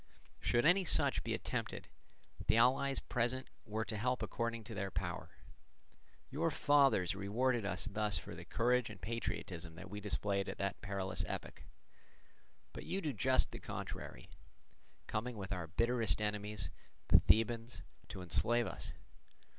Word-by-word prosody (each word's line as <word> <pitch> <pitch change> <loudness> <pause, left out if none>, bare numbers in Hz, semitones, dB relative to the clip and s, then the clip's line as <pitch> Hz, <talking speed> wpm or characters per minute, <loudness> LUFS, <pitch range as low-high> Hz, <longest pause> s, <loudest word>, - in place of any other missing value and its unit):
Should 120 +3 +2
any 180 +4 +6
such 175 - +3
be - - 0
attempted, - - -3 0.6
the 110 - +5
allies 135 +3 +4
present 125 +2 -1 0.2
were 110 +1 -1
to 110 - -3
help 125 +4 0
according 115 -1 -2
to 110 - -7
their 100 -2 -2
power. - - -3 1.0
Your 160 +5 +1
fathers 140 - +4
rewarded 110 +4 +1
us 95 -1 -1
thus 105 -2 +1
for - - -7
the 85 +1 -8
courage 120 +5 +2
and 105 -2 -9
patriotism 85 -5 -4
that 95 +2 -9
we 105 - -4
displayed 100 -1 0
at - - -5
that 100 -1 -2
perilous 95 -2 -1
epoch; - - -6 1.1
but - - -7
you 190 - -2
do 155 -7 -2
just 130 +3 +3
the - - -6
contrary, - - -6 0.7
coming 115 +2 -3
with 100 -1 -4
our 90 -3 -3
bitterest 115 +5 +2
enemies, 105 -2 -2 0.4
the - - +9
Thebans, 115 +2 +2 0.2
to 95 -2 -6
enslave 120 +7 +2
us. - - -5
110 Hz, 145 wpm, -36 LUFS, 100-125 Hz, 1.1 s, the